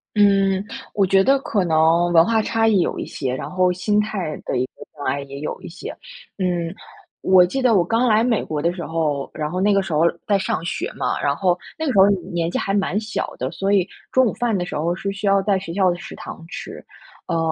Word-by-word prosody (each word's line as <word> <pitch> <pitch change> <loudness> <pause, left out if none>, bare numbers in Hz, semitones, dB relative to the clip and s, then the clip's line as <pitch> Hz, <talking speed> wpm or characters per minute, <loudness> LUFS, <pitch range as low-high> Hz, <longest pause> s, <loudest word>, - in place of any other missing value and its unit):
嗯， 195 -2 +4 0.3
我 200 -2 +3
觉 195 +1 +4
得 270 +3 +4
可 205 -7 0
能 165 +1 +3
文 165 -1 +6
化 225 +1 +2
差 225 0 +1
异 205 -4 +4
有 - - -1
一 - - -3
些， 130 -3 -3
然 130 - -5
后 185 0 +2
心 205 +4 +1
态 190 -7 -3
的 130 - -1
一 125 - +1
个 - - -11
障 145 -2 -8
碍 140 - 0
也 140 0 -8
有 150 - -4
一 - - -8
些。 180 +3 -8 0.4
嗯， 175 -2 -1 0.5
我 185 -1 +6
记 265 +9 -2
得 245 -3 +4
我 175 - +4
刚 230 +7 +1
来 215 +1 +4
美 235 -3 +1
国 150 -2 -3
的 170 +2 +1
时 175 -3 -6
候， 155 -4 -1
然 150 -1 -3
后 180 +2 -2
那 205 +1 +3
个 195 - +3
时 190 -4 -5
候 150 - +2 0.3
在 200 -2 +3
上 180 -3 -2
学 395 - -3
嘛， - - -1
然 - - +1
后 180 -2 +1 0.2
那 320 - -1
个 260 - +1
时 - - 0
候， 190 - +8
呃， 200 - +4 0.2
年 170 0 -1
纪 - - -1
还 195 - -1
蛮 200 0 +1
小 215 0 -4
的， 130 +1 -2
所 195 +1 -1
以 190 -3 +3 0.2
中 260 0 +4
午 220 - 0
饭 235 -4 0
的 175 - -2
时 - - -6
候 170 +3 0
是 195 +2 -4
需 200 +1 -3
要 195 0 +4
在 200 -1 +2
学 170 -3 -6
校 190 -1 +3
的 175 - 0
食 - - -9
堂 165 - -9
吃。 - - -8 0.4
呃， 165 - 0
185 Hz, 275 characters per minute, -21 LUFS, 165-205 Hz, 0.5 s, 候